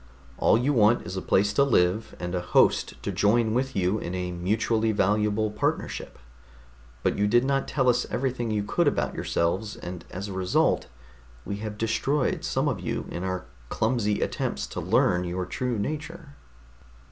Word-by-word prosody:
All -, -, +5 dB
you 130 Hz, +5 st, +1 dB
want 115 Hz, -1 st, +4 dB
is 90 Hz, -, -5 dB
a 95 Hz, -, -2 dB
place 100 Hz, +1 st, +2 dB
to 140 Hz, -, +4 dB
live, 110 Hz, -3 st, +1 dB
and 90 Hz, 0 st, -4 dB
a 90 Hz, -, 0 dB
host 90 Hz, -, +3 dB
to -, -, -2 dB
join 110 Hz, +2 st, +2 dB
with 130 Hz, +2 st, -1 dB
you 95 Hz, +3 st, +1 dB
in 90 Hz, -1 st, -4 dB
a 90 Hz, -1 st, -3 dB
mutually 110 Hz, +5 st, 0 dB
valuable 105 Hz, +1 st, +1 dB
partnership. 105 Hz, -, -2 dB, 0.9 s
But -, -, 0 dB
you 105 Hz, -, +3 dB
did 120 Hz, +4 st, +3 dB
not 135 Hz, 0 st, 0 dB
tell 135 Hz, -3 st, 0 dB
us 125 Hz, 0 st, +3 dB
everything 125 Hz, -3 st, -1 dB
you 105 Hz, -1 st, 0 dB
could 150 Hz, +11 st, +1 dB
about -, -, 0 dB
yourselves, 95 Hz, +6 st, -1 dB
and 90 Hz, -1 st, -7 dB
as 95 Hz, +3 st, -5 dB
a 100 Hz, -, -6 dB
result 95 Hz, -1 st, +1 dB, 0.6 s
we 100 Hz, -, -3 dB
have 105 Hz, 0 st, -6 dB
destroyed 130 Hz, +5 st, 0 dB
some 135 Hz, +3 st, 0 dB
of 125 Hz, -9 st, -1 dB
you 90 Hz, -, -3 dB
in 85 Hz, -, -4 dB
our 95 Hz, -1 st, -3 dB, 0.2 s
clumsy 110 Hz, -3 st, 0 dB
attempts -, -, -2 dB
to -, -, -5 dB
learn 90 Hz, -1 st, +2 dB
your 90 Hz, +1 st, -3 dB
true 125 Hz, +5 st, -2 dB
nature." 155 Hz, -, -4 dB
105 Hz, 175 wpm, -26 LUFS, 95-125 Hz, 0.9 s, All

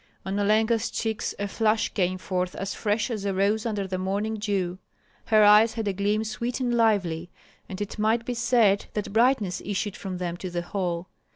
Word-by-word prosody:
On 190 Hz, +1 st, -2 dB
Olenka's 220 Hz, +3 st, +2 dB
cheeks 220 Hz, -2 st, -2 dB
a 205 Hz, -, -2 dB
flush 220 Hz, +2 st, +1 dB
came 185 Hz, -2 st, 0 dB
forth 185 Hz, -1 st, -2 dB
as 195 Hz, 0 st, -4 dB
fresh 215 Hz, +3 st, -1 dB
as 215 Hz, -4 st, -3 dB
a 200 Hz, -1 st, -1 dB
rose 210 Hz, +4 st, +1 dB
under 205 Hz, -3 st, -2 dB
the 185 Hz, -1 st, -3 dB
morning 200 Hz, +4 st, -1 dB
dew; 195 Hz, -4 st, -2 dB, 0.5 s
her 215 Hz, -1 st, +5 dB
eyes 210 Hz, +2 st, +7 dB
had 225 Hz, -2 st, -2 dB
a 200 Hz, -, +1 dB
gleam 205 Hz, +3 st, 0 dB
sweet 235 Hz, +4 st, -3 dB
and 245 Hz, -2 st, 0 dB
lively, 190 Hz, -8 st, +1 dB, 0.4 s
and 190 Hz, -, -6 dB
it 205 Hz, +1 st, -5 dB
might 225 Hz, +2 st, +2 dB
be 245 Hz, -, -2 dB
said 235 Hz, -4 st, +3 dB
that 210 Hz, -2 st, -3 dB
brightness 220 Hz, -6 st, +2 dB
issued 205 Hz, 0 st, -2 dB
from 190 Hz, -2 st, -5 dB
them 175 Hz, -1 st, -3 dB
to 185 Hz, -, -5 dB
the 175 Hz, 0 st, -3 dB
hall. 175 Hz, -1 st, -3 dB
205 Hz, 195 wpm, -26 LUFS, 190-220 Hz, 0.5 s, eyes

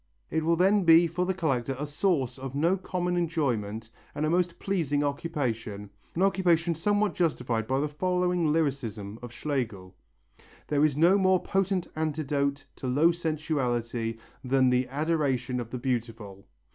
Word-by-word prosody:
It 160 Hz, 0 st, 0 dB
will 165 Hz, +1 st, +3 dB
then 195 Hz, +3 st, +3 dB
be 165 Hz, 0 st, +7 dB
for 175 Hz, +2 st, -1 dB
the 190 Hz, -, +1 dB
collector 135 Hz, -7 st, -1 dB
a 145 Hz, -, -3 dB
source 145 Hz, -5 st, 0 dB
of 135 Hz, 0 st, -6 dB
no 165 Hz, +6 st, +3 dB
common 180 Hz, -1 st, -2 dB
enjoyment 120 Hz, -11 st, -1 dB, 0.2 s
and 150 Hz, +1 st, -1 dB
a 155 Hz, -, +1 dB
most 175 Hz, 0 st, +1 dB
pleasing 155 Hz, -7 st, 0 dB
occupation, 120 Hz, -9 st, -3 dB, 0.2 s
an 180 Hz, -, +1 dB
occupation 175 Hz, -4 st, +2 dB
somewhat 205 Hz, +5 st, +1 dB
justifying 120 Hz, -10 st, -1 dB
the 135 Hz, +3 st, +1 dB
following 180 Hz, +1 st, 0 dB
lyricism 115 Hz, -9 st, -2 dB
of 120 Hz, -2 st, -8 dB
Schlegel: 120 Hz, -8 st, -3 dB, 0.8 s
"There 145 Hz, 0 st, +2 dB
is 150 Hz, -2 st, +2 dB
no 175 Hz, +6 st, +5 dB
more 185 Hz, -1 st, +4 dB
potent 195 Hz, -1 st, 0 dB
antidote 145 Hz, -2 st, -1 dB
to 130 Hz, -, -5 dB
low 145 Hz, +7 st, +4 dB
sensuality 125 Hz, -9 st, -2 dB, 0.3 s
than 130 Hz, 0 st, +3 dB
the 125 Hz, 0 st, +2 dB
adoration 135 Hz, -4 st, -1 dB
of 120 Hz, -2 st, -5 dB
the 125 Hz, -, -4 dB
beautiful. 115 Hz, -6 st, -4 dB
150 Hz, 150 wpm, -28 LUFS, 125-170 Hz, 0.8 s, be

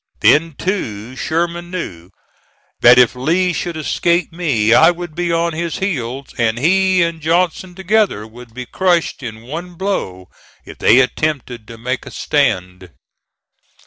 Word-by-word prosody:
Then, 165 Hz, +2 st, +4 dB
too, 125 Hz, -, -4 dB
Sherman 170 Hz, +4 st, -2 dB
knew 90 Hz, -, -6 dB, 0.7 s
that 120 Hz, +1 st, +7 dB
if 125 Hz, 0 st, +5 dB
Lee 175 Hz, +8 st, +1 dB
should 170 Hz, -1 st, -4 dB
escape 170 Hz, +3 st, 0 dB
me 130 Hz, -11 st, +1 dB
I 160 Hz, +7 st, +7 dB
would 175 Hz, -2 st, -4 dB
be 175 Hz, +1 st, -2 dB
on 170 Hz, 0 st, 0 dB
his 170 Hz, +1 st, -3 dB
heels, 135 Hz, -8 st, -3 dB
and 115 Hz, -1 st, +1 dB
he 185 Hz, +5 st, +3 dB
and 170 Hz, -1 st, -3 dB
Johnson 175 Hz, +2 st, 0 dB
together 190 Hz, -, +1 dB
would 120 Hz, +2 st, -13 dB
be 125 Hz, +2 st, -7 dB
crushed 175 Hz, 0 st, 0 dB
in 110 Hz, -3 st, -8 dB
one 170 Hz, +8 st, -7 dB
blow 95 Hz, -, -3 dB, 0.4 s
if -, -, -12 dB
they 130 Hz, -, +6 dB
attempted 125 Hz, -5 st, -2 dB
to 115 Hz, -, -10 dB
make 125 Hz, +3 st, -4 dB
a -, -, -6 dB
stand. 95 Hz, -, -1 dB
155 Hz, 145 wpm, -17 LUFS, 120-175 Hz, 0.7 s, that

